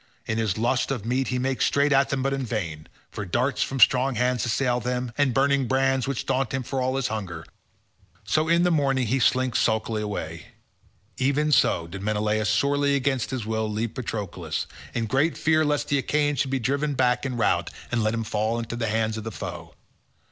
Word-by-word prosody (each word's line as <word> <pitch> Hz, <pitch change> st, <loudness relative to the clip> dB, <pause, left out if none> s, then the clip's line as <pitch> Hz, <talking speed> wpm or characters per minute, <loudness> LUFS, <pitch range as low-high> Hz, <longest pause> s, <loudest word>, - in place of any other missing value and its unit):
In 110 Hz, 0 st, -1 dB
his 110 Hz, -3 st, 0 dB
lust 120 Hz, +3 st, +1 dB
of 125 Hz, -6 st, -3 dB
meat 125 Hz, +3 st, 0 dB
he 125 Hz, -, -1 dB
makes 130 Hz, -2 st, 0 dB
straight 145 Hz, +1 st, +2 dB
at 135 Hz, 0 st, +3 dB
them 135 Hz, -1 st, -1 dB
but 135 Hz, 0 st, 0 dB
in 135 Hz, -1 st, -2 dB
vain, 85 Hz, -10 st, -4 dB, 0.2 s
for 105 Hz, -, -5 dB
darts 120 Hz, +9 st, 0 dB
from 135 Hz, -, -1 dB
strong 130 Hz, +1 st, +5 dB
hands 125 Hz, -1 st, +1 dB
assail 125 Hz, +1 st, +1 dB
him, 125 Hz, 0 st, -2 dB
and 140 Hz, -1 st, +2 dB
burning 135 Hz, 0 st, +2 dB
brands 135 Hz, 0 st, +1 dB
which 135 Hz, -3 st, -2 dB
daunt 135 Hz, -1 st, 0 dB
him 130 Hz, -, -2 dB
for 130 Hz, +2 st, -3 dB
all 130 Hz, +1 st, 0 dB
his 135 Hz, -1 st, 0 dB
hunger, 90 Hz, -8 st, -5 dB, 0.8 s
so 155 Hz, +1 st, +1 dB
in 170 Hz, +1 st, +4 dB
the 180 Hz, -, +3 dB
morning 135 Hz, -5 st, +2 dB
he 130 Hz, +5 st, +1 dB
slinks 130 Hz, -1 st, +2 dB
sulkily 110 Hz, -1 st, 0 dB
away—even 105 Hz, -, -4 dB
so 85 Hz, -, +3 dB
did 95 Hz, +3 st, -8 dB
Menelaus 105 Hz, +1 st, 0 dB
sorely 140 Hz, +5 st, +2 dB
against 135 Hz, -3 st, 0 dB
his 130 Hz, -5 st, -3 dB
will 110 Hz, -1 st, -1 dB
leave 110 Hz, +2 st, -2 dB
Patroclus, 110 Hz, -7 st, -4 dB, 0.3 s
in 115 Hz, -1 st, 0 dB
great 135 Hz, +8 st, +1 dB
fear 155 Hz, 0 st, +3 dB
lest 150 Hz, -1 st, 0 dB
the 140 Hz, -, +2 dB
Achaeans 145 Hz, +1 st, 0 dB
should 135 Hz, -, +1 dB
be 135 Hz, -, 0 dB
driven 140 Hz, +3 st, -1 dB
back 125 Hz, -1 st, +2 dB
in 130 Hz, -3 st, -3 dB
rout 115 Hz, -, +1 dB, 0.2 s
and 120 Hz, -1 st, +1 dB
let 110 Hz, +1 st, +1 dB
him 115 Hz, -, -2 dB
fall 110 Hz, +1 st, -1 dB
into 115 Hz, 0 st, -4 dB
the 115 Hz, -1 st, -2 dB
hands 110 Hz, 0 st, 0 dB
of -, -, -7 dB
the 115 Hz, -, -5 dB
foe. -, -, -7 dB
125 Hz, 205 wpm, -25 LUFS, 110-135 Hz, 0.8 s, strong